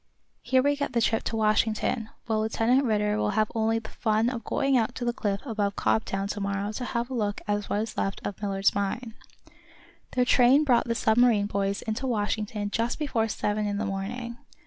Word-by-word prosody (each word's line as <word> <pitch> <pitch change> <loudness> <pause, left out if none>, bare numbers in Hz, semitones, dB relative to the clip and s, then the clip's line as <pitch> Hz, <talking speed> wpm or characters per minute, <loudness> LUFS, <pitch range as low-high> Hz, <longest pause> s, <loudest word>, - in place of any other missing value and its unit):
Here 260 -1 +2
we 285 +1 +3
get 285 0 -3
the 235 - +2
trip 225 0 +2
to - - -2
Washington, 220 +1 +1 0.2
while 220 -2 0
Lieutenant 230 +5 +2
Ridder 210 -2 +1
will 210 0 0
have 215 -1 +2
only 225 0 +1
the 225 - -6
fun 220 +1 +1
of 235 -3 -5
going 275 -1 +1
out 225 -3 +1
to 245 - -4
the 240 - +1
cliff 200 -4 -2
above 210 -5 -1
Cobtown 195 -2 0
to 205 - -3
morrow 200 +1 -2
to 245 +3 -4
have 240 +1 -2
a - - -3
look 210 -4 -1
at 205 0 0
what 205 - -1
is 225 - -7
left 195 - -1
of 205 - -5
Millard's 195 -1 +1
mine." 205 +4 -2 1.0
Their 250 -1 +2
train 255 +4 +5
brought 245 -6 +3
the 230 - 0
submarine 220 -2 +3
boys 200 0 -1
into 225 +5 -3
Washington 210 -2 -2
just 230 +2 -1
before 245 -7 0
seven 210 0 -1
in 205 0 -2
the 215 - -1
morning. 235 +5 -4
220 Hz, 205 wpm, -27 LUFS, 205-240 Hz, 1.0 s, train